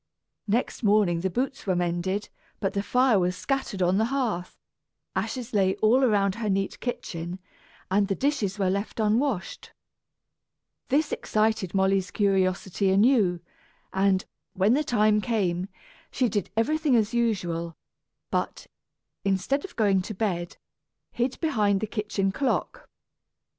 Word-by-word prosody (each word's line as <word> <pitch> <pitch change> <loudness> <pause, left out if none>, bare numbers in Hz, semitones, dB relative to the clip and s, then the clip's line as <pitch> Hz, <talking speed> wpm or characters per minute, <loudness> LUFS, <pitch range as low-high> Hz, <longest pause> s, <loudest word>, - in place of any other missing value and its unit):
Next 230 +5 0
morning 205 -6 +3
the 190 +3 -1
boots 255 +5 -3
were 185 - +2
mended, 175 +3 -1 0.3
but 195 - -1
the 200 - 0
fire 250 0 +3
was 180 0 0
scattered 265 -9 -2
on 180 +3 +2
the 220 - +3
hearth, 235 -9 -2 0.6
ashes 250 -4 -3
lay 190 -2 +3
all 240 +5 +3
about 200 -5 +3
her 215 - -1
neat 195 0 -1
kitchen, 175 -7 -4 0.5
and 200 +1 +3
the 195 - 0
dishes 225 -8 0
were 190 -2 +1
left 200 +4 -3
unwashed. 220 -1 -1 1.1
This 290 +3 +1
excited 215 -4 0
Molly's 190 -1 +2
curiosity 195 -1 +1
anew 195 -3 +3 0.5
and, 190 0 +2 0.3
when 195 +4 +3
the 275 - +3
next 305 - -3
time 215 -2 +3
came, 190 -6 0 0.4
she 255 - +1
did 205 -2 -2
everything 300 +4 +2
as 220 -1 +2
usual, 175 -8 -1 0.5
but, - - -2 0.6
instead 195 +9 0
of 375 - -9
going 200 -4 +3
to 215 +3 -6
bed, 180 -4 -2 0.5
hid 245 +2 -2
behind 210 - +2
the 220 - -1
kitchen 210 -2 -1
clock. 265 +5 -2
205 Hz, 135 wpm, -26 LUFS, 190-235 Hz, 1.1 s, morning